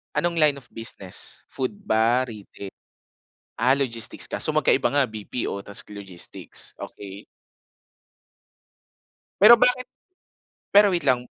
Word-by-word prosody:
Anong 170 Hz, -1 st, 0 dB
line 150 Hz, -2 st, +5 dB
of 135 Hz, -3 st, -14 dB
business, 105 Hz, -5 st, -4 dB
food 130 Hz, +10 st, -3 dB
ba, 120 Hz, -, +2 dB
retail? 100 Hz, -3 st, -10 dB, 0.9 s
Ah, 125 Hz, +3 st, +4 dB
logistics 120 Hz, -5 st, -2 dB
kaso -, -, -1 dB
magkaiba -, -, +2 dB
nga 140 Hz, -5 st, +2 dB
BPO 105 Hz, -1 st, -4 dB
ta's 100 Hz, -, -5 dB
logistics, 95 Hz, -4 st, -8 dB
okey. 100 Hz, +1 st, -9 dB, 2.2 s
Pero 225 Hz, +3 st, +10 dB
bakit 250 Hz, +1 st, +4 dB, 0.8 s
pero 205 Hz, -1 st, +6 dB
wait 170 Hz, -, +1 dB
lang, 125 Hz, -3 st, +1 dB
125 Hz, 110 wpm, -24 LUFS, 105-160 Hz, 2.2 s, Pero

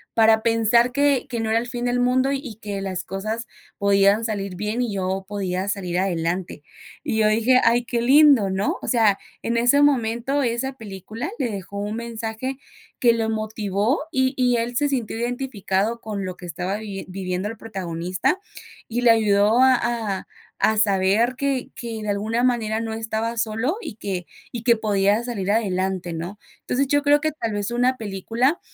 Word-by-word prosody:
para 220 Hz, -1 st, +5 dB
pensar 230 Hz, +2 st, +3 dB
que 280 Hz, -2 st, +2 dB
que 235 Hz, -2 st, -2 dB
no 220 Hz, -, -2 dB
era 225 Hz, +1 st, +3 dB
el 240 Hz, -, -5 dB
fin 240 Hz, -1 st, -5 dB
del 245 Hz, 0 st, +1 dB
mundo 255 Hz, +2 st, +2 dB
y 270 Hz, -5 st, -4 dB
que 205 Hz, -1 st, -4 dB
las 185 Hz, -2 st, -3 dB
cosas 215 Hz, +4 st, -4 dB, 0.3 s
podían 200 Hz, +1 st, +3 dB
salir 200 Hz, -4 st, -3 dB
bien 210 Hz, +5 st, -2 dB
y 235 Hz, -4 st, -1 dB
yo 190 Hz, 0 st, -2 dB
podía 190 Hz, -2 st, -2 dB
salir 180 Hz, -4 st, -2 dB
adelante". 175 Hz, -3 st, -2 dB, 0.4 s
Y 220 Hz, -, -1 dB
yo 215 Hz, -, +4 dB
dije: 230 Hz, +4 st, +4 dB
"ay, 235 Hz, +1 st, +4 dB
qué 235 Hz, 0 st, -1 dB
lindo", 270 Hz, -5 st, +6 dB
¿no? 190 Hz, +2 st, -1 dB
O -, -, -7 dB
sea, 220 Hz, -5 st, +3 dB, 0.3 s
en 235 Hz, +1 st, 0 dB
ese 245 Hz, +5 st, +4 dB
momento 265 Hz, 0 st, +2 dB
esa 245 Hz, +1 st, -1 dB
película 215 Hz, -, -7 dB
le 240 Hz, -, 0 dB
dejó 200 Hz, 0 st, -6 dB
un 210 Hz, +2 st, -3 dB
mensaje 235 Hz, +2 st, -4 dB, 0.4 s
que 240 Hz, -, +5 dB
lo 225 Hz, -1 st, -1 dB
motivó 215 Hz, -, -1 dB
y 260 Hz, -3 st, +1 dB
y 250 Hz, -1 st, +3 dB
él 235 Hz, +1 st, -2 dB
se 290 Hz, -, +2 dB
sintió 240 Hz, -5 st, -2 dB
identificado 235 Hz, -3 st, -1 dB
con 210 Hz, -2 st, -4 dB
lo 185 Hz, -1 st, -6 dB
que -, -, -10 dB
estaba 180 Hz, +3 st, -3 dB
viviendo 195 Hz, -2 st, -4 dB
el 225 Hz, -, -7 dB
protagonista 185 Hz, -, -2 dB, 0.5 s
y 235 Hz, +2 st, -2 dB
le 240 Hz, -1 st, +6 dB
ayudó 215 Hz, +1 st, +4 dB
a 260 Hz, 0 st, +6 dB
a 230 Hz, -5 st, -2 dB, 0.3 s
a 220 Hz, 0 st, +3 dB
saber 205 Hz, +4 st, +3 dB
que 275 Hz, -2 st, -1 dB
que, 230 Hz, -2 st, -6 dB
de -, -, -5 dB
alguna 215 Hz, +4 st, 0 dB
manera, 225 Hz, -3 st, +1 dB
no 225 Hz, -1 st, -3 dB
estaba 225 Hz, +1 st, -2 dB
solo 225 Hz, -, 0 dB
y 215 Hz, -, -7 dB
que 185 Hz, -5 st, -4 dB, 0.3 s
y 235 Hz, -1 st, -5 dB
que 235 Hz, -1 st, +4 dB
podía 205 Hz, 0 st, +2 dB
salir 200 Hz, -5 st, -2 dB
adelante, 190 Hz, -4 st, -1 dB
¿no? 175 Hz, +6 st, -6 dB, 0.2 s
Entonces, 275 Hz, +2 st, 0 dB
yo 290 Hz, +1 st, +2 dB
creo 290 Hz, 0 st, +5 dB
que 310 Hz, 0 st, 0 dB
tal 230 Hz, -7 st, -3 dB
vez 205 Hz, +1 st, -2 dB
una 250 Hz, +2 st, +2 dB
película, 230 Hz, -, -1 dB
220 Hz, 180 wpm, -23 LUFS, 200-245 Hz, 0.5 s, lindo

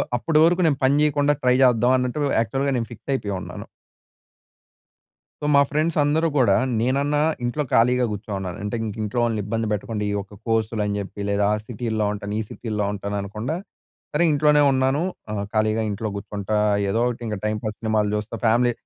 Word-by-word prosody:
అప్పటి 155 Hz, +6 st, +2 dB
వరకు 175 Hz, +2 st, +4 dB
నేను 140 Hz, -, +2 dB
పని 135 Hz, +2 st, +4 dB
చేయకుండా 145 Hz, -1 st, +3 dB
ట్రై 125 Hz, 0 st, +3 dB
చేద్దాం 125 Hz, 0 st, +4 dB
అన్నట్టు, 125 Hz, +3 st, -2 dB, 0.2 s
యాక్చువల్‌గా 135 Hz, +5 st, 0 dB
నేను 115 Hz, -2 st, -2 dB
ఫిక్స్ 120 Hz, +4 st, -7 dB
అయిపోయి 100 Hz, -7 st, -2 dB
ఉన్నాను. -, -, -8 dB, 1.9 s
మా 140 Hz, -, +7 dB
ఫ్రెండ్స్ 155 Hz, +3 st, 0 dB
అందరూ 155 Hz, +3 st, +2 dB
కూడా 100 Hz, -7 st, +4 dB, 0.2 s
నేనన్నా 140 Hz, +5 st, +1 dB, 0.2 s
ఇంట్లో 120 Hz, +5 st, -1 dB
ఖాళీగా 125 Hz, +2 st, +4 dB
కూర్చో‌ను‌న్నాను. 100 Hz, -3 st, -5 dB
అంటే 105 Hz, +3 st, -3 dB
ఇంక 105 Hz, -2 st, -5 dB
ఇంట్లో 105 Hz, +3 st, -2 dB
వాళ్ళని 115 Hz, -3 st, 0 dB
ఇబ్బంది 110 Hz, +1 st, -2 dB
పెట్టకుండా 105 Hz, 0 st, -2 dB
ఈ -, -, -1 dB
ఒక్క 100 Hz, +1 st, -14 dB
కోర్సులు 110 Hz, -1 st, 0 dB
అని 105 Hz, 0 st, -1 dB
చెప్పి 100 Hz, +1 st, -6 dB
లేదా 100 Hz, 0 st, +2 dB
ఆ -, -, +2 dB
సిటీల్లో 110 Hz, -3 st, -2 dB
ఉంటాను, 105 Hz, 0 st, -5 dB
ఈ -, -, 0 dB
సిటీల్లో 105 Hz, -3 st, -3 dB
ఉంటాను 100 Hz, 0 st, -4 dB
అనకుండా. 105 Hz, +10 st, -4 dB, 0.6 s
సరే, 150 Hz, +3 st, +2 dB
ఇంట్లోనే 150 Hz, 0 st, +4 dB
ఉన్నాను. 135 Hz, +2 st, +1 dB, 0.3 s
ఆహ్, 100 Hz, -1 st, -2 dB
ఖాళీగా 110 Hz, 0 st, +1 dB
ఇంట్లో 105 Hz, +2 st, -3 dB
కూర్చుంటా 100 Hz, +1 st, -3 dB, 0.3 s
ఏదో 110 Hz, +4 st, +1 dB
ఒకటి 120 Hz, 0 st, -4 dB
ఇంక 105 Hz, -, -2 dB
టైంపాస్ 105 Hz, 0 st, -2 dB
సినిమాలు 110 Hz, -2 st, +1 dB
చూస్తా 105 Hz, +2 st, -4 dB
ఫ్యామిలీ 120 Hz, +2 st, +4 dB
115 Hz, 170 wpm, -23 LUFS, 105-135 Hz, 1.9 s, మా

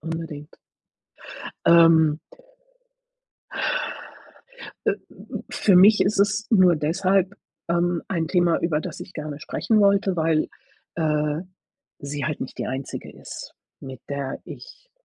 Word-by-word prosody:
Unbedingt. 160 Hz, -2 st, -6 dB, 1.1 s
Ähm. 160 Hz, -2 st, +6 dB, 2.7 s
Äh, -, -, +3 dB, 0.6 s
für 195 Hz, -4 st, +3 dB
mich 205 Hz, +4 st, +7 dB
ist 195 Hz, +1 st, +2 dB
es 205 Hz, +2 st, +2 dB
nur 185 Hz, -6 st, +5 dB
deshalb, 185 Hz, +5 st, +1 dB, 0.3 s
ähm, 175 Hz, 0 st, +1 dB
ein 165 Hz, -4 st, -1 dB
Thema, 175 Hz, -1 st, +2 dB
über 155 Hz, -3 st, 0 dB
das -, -, -7 dB
ich 185 Hz, -, -9 dB
gerne 150 Hz, -1 st, -6 dB
sprechen 215 Hz, +7 st, 0 dB
wollte, 200 Hz, -2 st, +3 dB
weil, 160 Hz, -1 st, +1 dB, 0.5 s
äh, 150 Hz, -1 st, 0 dB, 0.6 s
sie 140 Hz, 0 st, -4 dB
halt 150 Hz, -, -3 dB
nicht -, -, -7 dB
die -, -, -2 dB
einzige 130 Hz, +1 st, -5 dB
ist, -, -, -10 dB, 0.3 s
mit 130 Hz, -3 st, -9 dB
der 140 Hz, -1 st, -4 dB
ich -, -, -12 dB
165 Hz, 115 wpm, -24 LUFS, 150-190 Hz, 2.7 s, mich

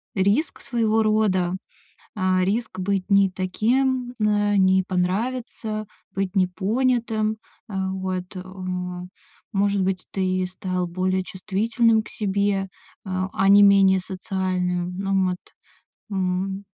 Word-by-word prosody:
риск 205 Hz, +11 st, +1 dB
своего 225 Hz, -3 st, +1 dB
рода. 200 Hz, -5 st, +2 dB, 0.6 s
А, 185 Hz, -1 st, +2 dB
риск 215 Hz, +1 st, -1 dB
быть 195 Hz, +1 st, -1 dB
не 195 Hz, -1 st, +4 dB
таким, 245 Hz, +7 st, 0 dB
э, 205 Hz, -1 st, +2 dB
не 190 Hz, 0 st, +4 dB
понравиться, 215 Hz, +3 st, -2 dB, 0.3 s
быть 195 Hz, 0 st, -2 dB
непонятым, 215 Hz, +4 st, +1 dB, 0.3 s
э. 205 Hz, -, -8 dB
Вот, 190 Hz, -1 st, -3 dB
э. 185 Hz, -, -5 dB, 1.1 s
Может 200 Hz, 0 st, +2 dB
быть, 185 Hz, -1 st, -1 dB
ты 185 Hz, -1 st, 0 dB
стал 185 Hz, -1 st, -3 dB
более 185 Hz, +1 st, 0 dB
чувствительным 220 Hz, +5 st, +1 dB
к -, -, -12 dB
себе, 200 Hz, -1 st, 0 dB, 0.4 s
э, -, -, -7 dB, 0.2 s
а 195 Hz, +1 st, +2 dB
не 205 Hz, +1 st, +8 dB
менее 195 Hz, -1 st, +6 dB
социальным. 180 Hz, -2 st, -2 dB
Ну 195 Hz, -1 st, +1 dB
вот, 180 Hz, -, -2 dB, 0.7 s
м. 190 Hz, +1 st, -1 dB
195 Hz, 115 wpm, -23 LUFS, 185-215 Hz, 1.1 s, не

